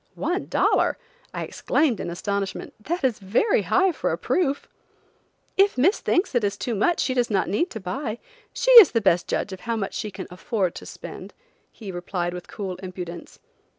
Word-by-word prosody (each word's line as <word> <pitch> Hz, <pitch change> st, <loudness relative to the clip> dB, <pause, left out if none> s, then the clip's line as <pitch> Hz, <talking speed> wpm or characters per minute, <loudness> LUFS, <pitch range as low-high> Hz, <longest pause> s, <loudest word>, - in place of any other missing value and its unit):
"One 365 Hz, +2 st, -2 dB
dollar!" -, -, +2 dB, 0.3 s
I -, -, -4 dB
exclaimed 275 Hz, -10 st, 0 dB
in -, -, -4 dB
astonishment, 195 Hz, +2 st, -3 dB
"That 335 Hz, +10 st, -3 dB
is 255 Hz, -5 st, +1 dB
very 215 Hz, -, +2 dB
high 380 Hz, 0 st, +3 dB
for 320 Hz, -, -2 dB
a -, -, -1 dB
proof." 285 Hz, -6 st, 0 dB, 0.9 s
"If 395 Hz, -4 st, +4 dB
Miss 350 Hz, -, +3 dB
thinks 360 Hz, -2 st, +1 dB
it 245 Hz, -3 st, +1 dB
is 200 Hz, -1 st, -1 dB
too 240 Hz, -, -3 dB
much 270 Hz, -, +1 dB
she 260 Hz, -, +1 dB
does 245 Hz, -2 st, +1 dB
not 195 Hz, -3 st, +1 dB
need 335 Hz, -, 0 dB
to 220 Hz, -, -6 dB
buy. 220 Hz, +4 st, -4 dB, 0.3 s
She -, -, +1 dB
is 370 Hz, -, +2 dB
the 230 Hz, -, +3 dB
best 180 Hz, -3 st, +2 dB
judge 200 Hz, -, -2 dB
of 190 Hz, -, -8 dB
how 230 Hz, +4 st, -3 dB
much 200 Hz, -3 st, -3 dB
she 215 Hz, -, -3 dB
can 190 Hz, -, -7 dB
afford 185 Hz, 0 st, -1 dB
to -, -, -9 dB
spend," -, -, -9 dB, 0.4 s
he 205 Hz, -4 st, -8 dB
replied 175 Hz, 0 st, -3 dB
with 180 Hz, -1 st, -8 dB
cool 190 Hz, -3 st, -5 dB
impudence. 180 Hz, -2 st, -8 dB
215 Hz, 190 wpm, -24 LUFS, 185-285 Hz, 0.9 s, If